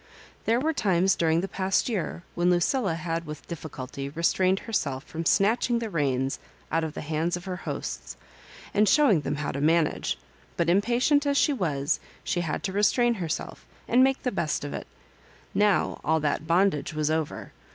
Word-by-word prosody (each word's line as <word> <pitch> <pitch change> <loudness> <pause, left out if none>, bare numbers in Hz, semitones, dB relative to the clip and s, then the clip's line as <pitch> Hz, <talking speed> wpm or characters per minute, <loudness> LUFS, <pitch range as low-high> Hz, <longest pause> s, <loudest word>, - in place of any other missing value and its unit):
There 230 +2 +3
were 315 +4 0
times 190 - +2
during 165 0 +2
the 195 - -3
past 190 0 0
year 195 -6 -3
when 175 +1 +2
Lucilla 180 +2 +2
had 165 0 -3
with 150 -1 -8
difficulty 140 -4 -6
restrained 185 +5 +1
herself 140 - -2
from 165 0 -4
snatching 230 +4 +3
the 230 -1 -3
rems 135 -4 0 0.3
out 165 0 +1
of 160 -1 -4
the - - -4
hands 160 +3 -1
of 175 - -10
her 185 -1 -4
hosts, 60 - -5 0.6
and 210 0 +4
show 290 +5 +5
ing 170 -6 +3
them 145 - -2
how 145 0 -3
to 140 - -4
managp. 160 +1 +2 0.4
But 170 0 +2
impatient 245 - +3
as 280 0 +2
she 290 - +3
was, 150 - 0 0.2
she 175 - -1
had 160 -3 -3
to 190 - -2
restrain 235 +4 +3
herself, 160 -3 -4 0.2
and 255 +1 +5
make 270 0 +2
the 250 - 0
best 170 -7 -1
of 145 - -5
it - - -6 0.7
Now 205 -1 +2
all 160 +1 +2
that 150 +1 -1
bondage 170 -3 +2
was 155 0 0
over. 160 -1 -2
170 Hz, 185 wpm, -27 LUFS, 155-205 Hz, 0.7 s, show